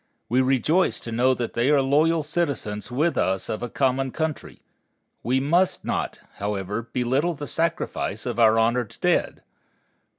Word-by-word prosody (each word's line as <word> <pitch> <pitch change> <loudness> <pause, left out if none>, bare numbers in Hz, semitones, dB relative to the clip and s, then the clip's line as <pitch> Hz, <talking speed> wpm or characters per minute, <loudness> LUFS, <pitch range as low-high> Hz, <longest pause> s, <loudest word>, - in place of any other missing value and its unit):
We 125 +3 +3
rejoice 135 +8 +2
to 115 - -7
know 125 +3 +3
that 120 -2 -4
they 120 +3 +1
are 145 -1 +5
loyal 155 +4 +2
citizens 140 -10 -2
with 150 +7 0
us 95 0 0
of 110 - -3
a 120 - -4
common 135 +1 0
country. 155 +2 -4 0.6
We 125 +4 +1
must 170 +7 +1
not, - - -2 0.2
however, 105 +3 -3
belittle 130 +8 0
the 145 - -6
sacrifice 160 -9 -2
of 120 -2 -3
our 110 -1 +5
honored 115 0 +1
dead. - - 0
130 Hz, 155 wpm, -24 LUFS, 115-150 Hz, 0.6 s, are